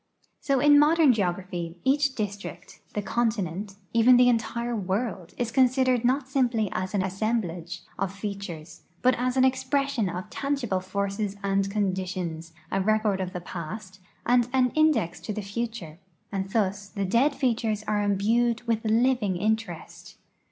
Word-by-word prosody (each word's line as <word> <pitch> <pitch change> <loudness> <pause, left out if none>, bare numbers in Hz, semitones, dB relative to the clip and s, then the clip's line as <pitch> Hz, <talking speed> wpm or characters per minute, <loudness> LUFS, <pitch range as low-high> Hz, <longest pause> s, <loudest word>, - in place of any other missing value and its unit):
So 275 -2 +1
in 290 +1 +6
modern 305 -2 +5
geograj)!!}'' 180 -4 -2
each 275 0 +2
district, 200 -4 -6 0.2
the 210 - -1
continent, 205 -4 -1 0.2
even 240 +2 +6
the 245 0 +6
entire 235 +1 -1
world 195 -2 -3
is 240 -2 -2
considered 255 -1 +3
not 260 +2 +1
simply 245 -6 +1
as 185 +3 -3
an 190 - +2
assemblage 190 -4 -2 0.2
of 195 -1 -1
feat 200 0 -5
ures. 165 -4 -8 0.2
but 255 +1 +5
as 255 +1 0
an 260 - +5
expression 265 -4 0
of 180 +4 -6
tangible 275 -9 -1
forces 200 +2 -3
and 195 0 +1
conditions, 185 -5 -2 0.2
a 195 - +1
record 215 -1 +1
of 185 -1 -3
the 180 -1 -5
[>ast, 185 +3 -7 0.3
and 245 0 +3
an 255 -2 +3
index 300 - +2
to 215 - -5
the 215 - -4
future, 205 -6 -5 0.3
and 195 -1 -3
thus 200 -1 -1
the 200 -2 -3
dead 255 +9 +2
features 225 -5 0
are 210 -1 +1
imbued 225 +4 +1
with 230 -2 0
living 225 -3 +2
interest. 200 -2 -3
215 Hz, 150 wpm, -26 LUFS, 190-245 Hz, 0.3 s, in